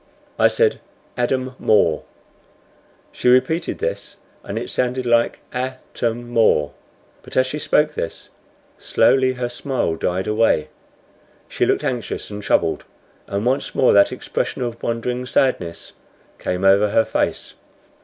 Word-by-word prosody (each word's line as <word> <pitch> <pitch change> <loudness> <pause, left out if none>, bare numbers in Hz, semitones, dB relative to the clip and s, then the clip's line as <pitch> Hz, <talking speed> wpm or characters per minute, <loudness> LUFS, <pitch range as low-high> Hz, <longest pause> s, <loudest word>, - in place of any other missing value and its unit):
I - - +6
said 460 -2 +1 0.3
"Adam 130 +1 -1
More." 90 -7 +3 1.1
She - - 0
repeated 160 +7 +2
this, 485 +4 -4 0.3
and - - -5
it - - -4
sounded 125 0 -1
like 120 -1 +2
"A 130 +1 -2 0.2
tam 120 +1 -3
or." 75 -10 +3 0.5
But - - -8
as 130 - +5
she 145 +4 -4
spoke 150 +1 +2
this 85 - -5 0.5
slowly 130 -1 +3
her 125 -1 -3
smile 120 - -2
died 90 +3 -1
away. 105 -8 +2 0.8
She - - 0
looked - - +1
anxious 120 -4 -3
and 105 0 -6
troubled, 85 -5 +1 0.4
and 100 +3 -2
once 130 +3 -1
more 130 - +4
that 100 0 +5
expression - - -3
of 120 -1 -5
wondering 125 +2 -2
sadness 90 -11 0 0.5
came 90 +1 -3
over 100 +2 +5
her 110 +2 +3
face. - - -2
120 Hz, 135 wpm, -21 LUFS, 105-130 Hz, 1.1 s, I